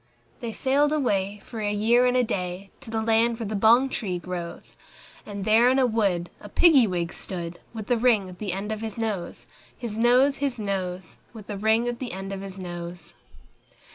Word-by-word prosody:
They 235 - -4
sailed 280 +5 +2
away, 205 -9 0
for 230 - -8
a 205 -1 -1
year 230 +4 +3
and 250 0 +2
a 250 - +4
day, 185 -2 -4
To 275 - -8
the 220 0 -1
land 225 +1 +2
where 230 - -4
the 210 - -4
bong 230 +6 +5
tree 200 -8 -3
grows; 175 -1 -7 0.5
And 200 -2 -5
there 225 +3 +5
in 260 - +3
a 265 - +4
wood 200 -7 0
a 205 - -11
Piggy 280 - +6
wig 175 -2 -2
stood, 175 -2 -5
With 220 0 -7
a 245 - +4
ring 225 -5 +3
at 180 -1 -11
the 205 -3 -3
end 195 +4 -4
of 215 0 -4
his 220 -1 -5
nose, 215 -6 -3 0.3
His 225 -3 -5
nose, 255 +4 +4
His 275 -3 -1
nose, 185 -4 -4 0.2
With 215 -3 -11
a - - -3
ring 220 +3 +2
at 240 -1 -3
the 255 -2 -5
end 195 +1 -5
of 195 - -5
his 195 -1 -8
nose. 175 -2 -7
215 Hz, 205 wpm, -25 LUFS, 190-240 Hz, 0.5 s, Piggy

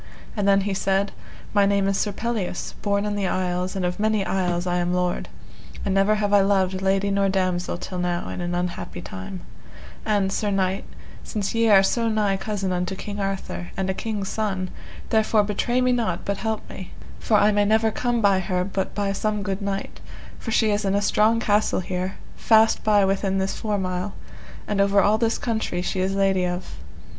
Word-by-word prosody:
And 205 -2 0
then 195 0 +5
he 200 0 -1
said, 195 +1 +1 0.4
My 200 -1 +4
name 200 -1 +2
is 195 - +1
Sir 205 - 0
Pelleas, 215 -4 -3
born 200 0 0
in 210 - -1
the 200 -2 -1
Isles, 180 0 -1
and 190 -2 -1
of 180 +3 -2
many 215 -2 +1
isles 180 -2 0
I 180 -1 0
am 175 0 0
lord, 180 -1 -1 0.6
and 195 - +1
never 195 +2 +3
have 205 -1 0
I 200 - +7
loved 190 -1 +1
lady 195 +1 +1
nor 195 0 +2
damosel 185 -2 0
till 180 +1 -5
now 175 0 -1
in - - -5
an 175 0 -2
unhappy 175 - -3
time; 95 +1 -7 0.6
and, 200 -3 +1
sir 210 +1 -1
knight, 195 0 0 0.4
since 205 -3 -3
ye 230 0 +3
are 195 -2 +7
so 230 +3 +1
nigh 210 -3 +1
cousin 195 -1 -2
unto 180 +1 -1
King 205 +1 -6
Arthur, 195 -2 -3
and 190 0 0
a - - -2
king's 205 -1 -3
son, 190 -4 -2 0.4
therefore 220 -1 +3
betray 225 +5 0
me 255 0 +3
not 225 -8 -1
but 200 0 -1
help 220 -1 -3
me, 185 - -9 0.3
for 215 - +2
I 205 +1 +5
may 205 0 +3
never 220 +1 +3
come 240 +1 0
by 200 -2 +4
her 180 -1 -1
but 190 0 -3
by 200 -1 0
some 210 +1 -1
good 195 0 -3
knight, 200 0 -4 0.4
for - - -6
she 220 -1 +3
is 205 +1 0
in 195 0 +1
a 200 - +2
strong 220 +2 +3
castle 210 -3 +1
here, 185 +1 -3 0.2
fast 220 0 +4
by 210 -2 +4
within 195 0 0
this 190 0 -1
four 210 -2 -2
mile, 185 +1 -3 0.5
and 205 -1 +1
over 200 0 +4
all 210 +2 +3
this 230 0 +1
country 220 -6 -2
she 185 - -2
is 190 +1 0
lady 195 -1 +2
of. 180 - -5
195 Hz, 205 wpm, -24 LUFS, 185-210 Hz, 0.6 s, I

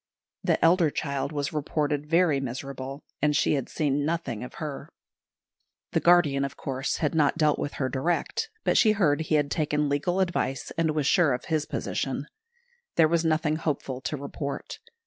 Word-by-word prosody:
The - - +2
elder 170 -1 +5
child 140 -1 -2
was 145 -1 -2
reported 150 0 -1
very 165 -4 +3
miserable, 135 +2 -6 0.2
and 150 0 +2
she - - +3
had 135 -4 -2
seen 145 -2 0
nothing 145 -8 -2
of 125 - -9
her. 150 -3 -6 1.0
The - - +2
guardian, 165 -6 +4
of 140 0 -4
course, 135 -1 -2
had 150 - 0
not 155 -1 +2
dealt 155 -2 +2
with 145 - -3
her 130 - -1
direct; 155 +7 -1
but - - +3
she 215 -2 +5
heard 160 -8 +2
he 155 0 0
had 145 -2 +1
taken 150 -1 0
legal 160 +6 0
advice, 175 -7 -1
and 160 -2 +1
was 150 -2 0
sure 155 -2 +4
of 125 - -4
his 155 -2 -1
position. - - -2 0.7
There 160 - +6
was 165 +1 +1
nothing 155 -1 +1
hopeful 140 -5 -3
to 150 - -3
report. 140 0 -5
150 Hz, 175 wpm, -27 LUFS, 140-160 Hz, 1.0 s, There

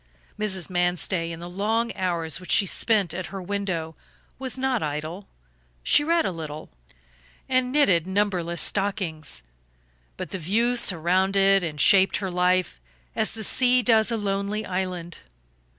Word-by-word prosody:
Mrs. 190 -5 -1
Manstey, 175 -1 -1
in 165 - -7
the 175 - -7
long 220 +6 -1
hours 170 -5 -1
which 185 -5 -8
she 200 - +5
spent 200 -3 +1
at 185 0 -5
her 195 - -7
window, 185 -4 -3 0.5
was 260 -2 -4
not 260 -2 0
idle. 155 +6 -5 0.6
She 290 - +5
read 335 +1 +1
a - - 0
little, 155 -2 -8 0.8
and 255 -1 +1
knitted 185 - +3
numberless 190 -4 -1
stockings; 175 - -1 0.7
but - - -6
the 190 - -4
view 225 +9 +1
surrounded 195 0 +3
and 155 -3 -5
shaped 190 +6 +5
her 190 -2 -4
life 180 - 0 0.3
as - - 0
the 220 - -5
sea 250 +3 +3
does 220 -2 +4
a 230 - 0
lonely 200 +1 -2
island. 180 -2 -4
190 Hz, 145 wpm, -24 LUFS, 170-215 Hz, 0.8 s, she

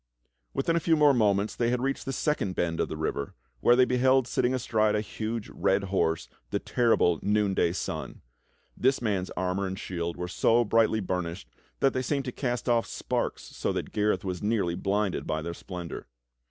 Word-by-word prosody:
^Yithin 165 +5 +1
a - - +3
few 165 0 +3
more 150 -2 +5
moments 105 -3 +2
they 120 -1 +1
had 125 0 +1
reached 135 +2 -2
the 135 - -2
second 135 - -1
bend 85 -1 -1
of - - 0
the 80 - -5
river, 70 -3 -3 0.2
where 120 - +5
they 130 0 +5
beheld 130 0 +3
sitting 125 - +1
astride 110 -4 +1
a - - +2
huge 110 +1 -4
red 95 +1 +1
horse 80 -3 +1 0.2
the - - 0
terrible 115 -9 +2
Noonday 100 -4 +2
Sun. - - -5 0.5
This 130 +2 +2
man's 100 -5 -1
armor 95 +1 0
and 95 0 -4
shield 85 -2 -4
were 90 0 -3
so 115 +6 +3
brightly 110 0 +3
burnished 85 -7 -3 0.3
that 135 - +4
they 130 - 0
seemed 135 +1 -1
to 125 - -3
cast 125 -1 -3
off 120 -1 +2
sparks - - -2
so - - -3
that - - -4
Gareth 105 -3 0
was 90 -2 -3
nearly 105 -5 +1
blinded 100 +1 -1
by 80 0 -1
their 85 0 -4
splendor. 90 -4 -7
105 Hz, 190 wpm, -28 LUFS, 90-125 Hz, 0.5 s, more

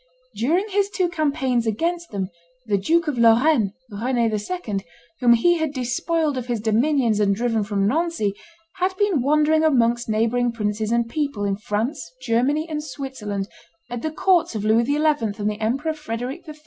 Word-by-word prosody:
During 335 - +1
his 400 0 +1
two 370 -3 0
campaigns 270 -8 0
against 335 +10 -1
them, 195 -2 -4 0.3
the 205 -3 +1
Duke 330 - +2
of 275 -5 -1
Lorraine, 230 -2 +4 0.2
Rend 240 +5 -2
II., 225 - -1 0.4
whom 240 -2 +5
he 340 +9 +3
had 315 -2 -1
despoiled 285 +3 -1
of 250 - -7
his 240 -2 -1
dominions 230 +1 +2
and 200 -1 +2
driven 225 -1 0
from 200 -1 -1
Nancy, 310 - 0 0.4
had 370 +1 0
been 400 -9 +2
wandering 305 +3 +3
amongst 240 -6 +2
neighboring 230 +2 +1
princes 215 -1 -2
and 235 0 +1
people 280 -5 -2
in 200 -1 0
France, 215 - -3
Germany, 260 +6 +1
and 300 -2 -4
Switzerland, 260 -9 -5 0.4
at 245 -1 -4
the 315 - -1
courts 345 -3 +2
of 215 -1 -3
Louis 225 +2 +3
XI. 285 +3 +1
and 295 -9 +1
the 210 0 -3
Emperor 270 +9 0
Frederic 275 +3 -6
III. 305 - -8
245 Hz, 170 wpm, -22 LUFS, 220-310 Hz, 0.4 s, whom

